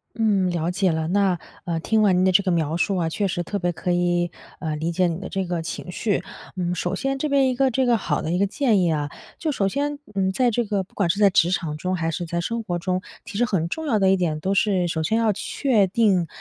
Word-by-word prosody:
嗯， 205 -5 +2
了 170 -1 -1
解 185 0 +1
了。 160 0 -1
那， 190 -1 +2 0.2
呃， 170 -3 -2
听 220 +6 +1
完 195 -4 +4
您 185 - +3
的 190 - +3
这 200 +2 +5
个 190 - +1
描 160 -2 0
述 190 +3 0
啊， 170 -2 0
确 200 +5 -1
实 175 -1 -2
特 205 - -3
别 175 -1 0
可 180 +1 -2
以， 175 0 +1 0.3
呃， 155 -1 -2
理 160 +3 -2
解 180 +1 +2
你 165 -1 -2
的 190 - -7
这 195 -1 -2
个 175 -1 -2
情 170 +2 -6
绪。 205 +3 -1 0.4
嗯， 180 -1 -1
首 175 - -2
先 270 0 -1
这 300 +2 -2
边 275 -1 +4
一 255 - -1
个 265 +1 +2
这 260 +2 +1
个 240 -1 +4
好 215 - -1
的 155 - -3
一 175 - +1
个 200 - +3
建 220 -1 +2
议 175 -2 +2
啊， 145 -2 -1 0.3
就 310 -3 -1
首 195 -6 +1
先， 285 +4 -2 0.2
嗯， 190 -1 +1
在 245 +3 +2
这 235 +1 0
个 200 -2 -1
不 185 - -24
管 195 -4 +1
是 165 - +1
在 205 -1 +6
职 175 -2 +3
场 165 -5 -2
中 185 +4 -2
还 165 -2 -1
是 175 +2 -3
在 170 +1 -2
生 230 +6 -2
活 180 -5 -3
中， 185 +1 -1 0.2
其 230 -3 -7
实 240 - +3
很 180 -8 -1
重 320 - -4
要 220 -6 +2
的 190 -1 +4
一 195 - +4
点 165 -4 0
都 190 +3 0
是 195 -2 +2
首 160 -1 -1
先 220 +8 +1
要 225 -1 +3
确 210 +1 +1
定 190 -4 +2
190 Hz, 295 characters per minute, -23 LUFS, 175-215 Hz, 0.4 s, 在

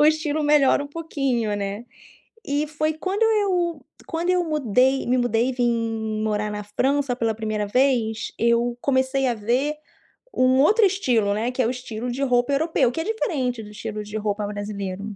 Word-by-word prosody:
O - - +6
estilo 310 0 +2
melhora 290 -1 +4
um - - -6
pouquinho, 275 -8 -2
né? 200 +2 -4 0.6
E 290 +2 -1
foi 310 +1 -1
quando 375 +7 -3
eu 370 -8 +1 0.2
quando 335 +1 -2
eu 365 -1 +3
mudei 270 -4 +1
me 255 +1 +2
mudei 245 0 +1
e - - 0
vim 225 -3 -1
morar 210 -1 -1
na 210 0 -5
França 265 +5 0
pela 225 -3 -1
1º 215 -2 -2
vez, 235 -2 +1
eu 235 +1 +2
comecei 265 0 +1
a 245 - +1
ver 245 +8 0 0.6
um 255 +1 +4
outro 420 - +5
estilo, 245 - +1
né, 225 +4 -1
que 255 - -1
é 235 - +2
o - - 0
estilo 245 -1 -5
de 265 +3 -2
roupa 245 0 +2
europeu 280 -4 +2
que 325 - -5
é - - -1
diferente 280 - -2
do 210 - -11
estilo 210 0 -6
de 210 +1 -6
roupa 210 -1 -2
brasileiro. 205 -1 -5
250 Hz, 180 wpm, -23 LUFS, 220-295 Hz, 0.6 s, O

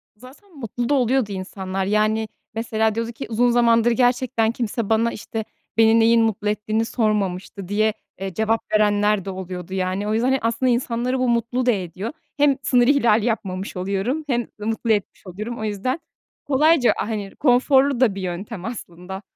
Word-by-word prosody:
Zaten 285 - -16
mutlu 240 0 -3
da 290 - +3
oluyordu 255 -4 +2
insanlar, 190 0 -4
yani, 215 +2 +1 0.3
mesela 220 -1 0
diyordu 230 +1 -2
ki 225 - -7
uzun 240 +2 +2
zamandır 235 -1 +4
gerçekten 245 -1 +2
kimse 230 -2 -3
bana, 225 +1 +2
işte, 220 0 -5 0.3
beni 225 0 +5
neyin 230 +1 +5
mutlu 210 -2 0
ettiğini 215 +1 -1
sormamıştı 200 -4 -1
diye, 215 +1 +1 0.3
eee, 190 -1 -4
cevap 220 +3 +1
verenler 210 -1 +2
de - - -4
oluyordu, 185 -1 -6
yani. 190 +2 -1
O 215 - 0
yüzden, 230 +3 +1
hani, 265 0 +2
aslında 230 +3 +1
insanları 245 +1 -1
bu 255 -1 +1
mutlu 235 +2 0
da 250 - +5
ediyor. 190 - -4 0.3
Hem 285 -2 +4
sınır 245 -1 +3
ihlali 235 -6 +3
yapmamış 195 -5 -3
oluyorum 200 +11 -1
hem 240 -4 0
mutlu 225 +2 -1
etmiş 205 -2 -2
oluyorum. 215 +6 -6
O - - -4
yüzden 215 +8 -2 0.5
kolayca, 295 -1 +4
hani, 205 -2 -4
konforlu 265 0 +3
da 230 -7 +3
bir 195 - -5
yöntem 185 +2 -5
aslında. 190 -4 -7
225 Hz, 165 wpm, -22 LUFS, 205-245 Hz, 0.5 s, beni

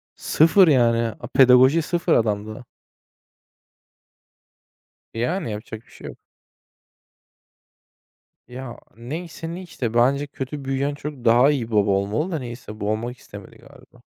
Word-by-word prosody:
Sıfır 165 +4 +4
yani. 115 -5 +2
A - - -8
pedagoji 130 +4 +5
sıfır 170 +1 0
adamda. 110 +1 -1 2.5
Yani, 125 - -2
yapacak 110 +1 -8
bir - - -24
şey - - -11
yok. - - -10 2.3
Ya 125 -1 -8 0.2
neyse 165 +7 -7
ne 180 - -7
işte. 130 -10 -5
Bence 135 +5 +2
kötü 140 +1 -7
büyüyen 135 +2 -1
çocuk 145 -3 -8
daha 120 +5 +5
iyi 120 -6 -3
baba 105 -2 +2
olmalı 100 - -1
da 160 - -2
neyse. 120 -4 -9
Bu 105 0 -1
olmak 120 +3 -4
istemedi - - -13
galiba. - - -19
125 Hz, 125 wpm, -22 LUFS, 115-150 Hz, 2.5 s, pedagoji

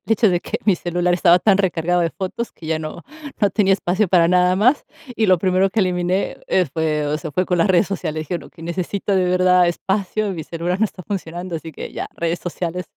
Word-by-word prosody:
De 225 - +2
hecho 220 0 +4
de 175 -1 +1
que 225 - -4
mi 200 - +5
celular 175 0 0
estaba 175 0 +5
tan 195 +1 +3
recargado 175 -2 +1
de 165 - 0
fotos, 195 +6 -5
que 160 - -12
ya 160 0 0
no 155 +2 -7 0.4
no 205 - +3
tenía 195 -1 +2
espacio 190 +2 +1
para 170 -2 +4
nada 180 0 +4
más, 250 +8 +3 0.3
y 225 - +2
lo 185 -1 +4
primero 185 +2 +2
que 220 - +1
eliminé, 180 0 0
eh, 185 -2 +2
fue, 155 -2 -1
o 150 - 0
sea, 160 -1 -6
fue 185 +5 0
con 180 - +1
las 170 - +3
redes 185 +1 +4
sociales, 160 -5 -3
dije: 155 +3 -5
"Bueno, - - -11
que 165 - -15
necesito 185 +4 -2
de 185 - +2
verdad 180 0 +4
espacio, 195 +4 -1
mi 160 -4 -6
celular 175 +4 -3
no 220 - +3
está 190 -3 -6
funcionando, 175 -2 -5
así 160 0 -8
que - - -7
ya, - - -4
redes 170 +1 -1
sociales", 175 0 -4
180 Hz, 235 wpm, -20 LUFS, 170-190 Hz, 0.4 s, mi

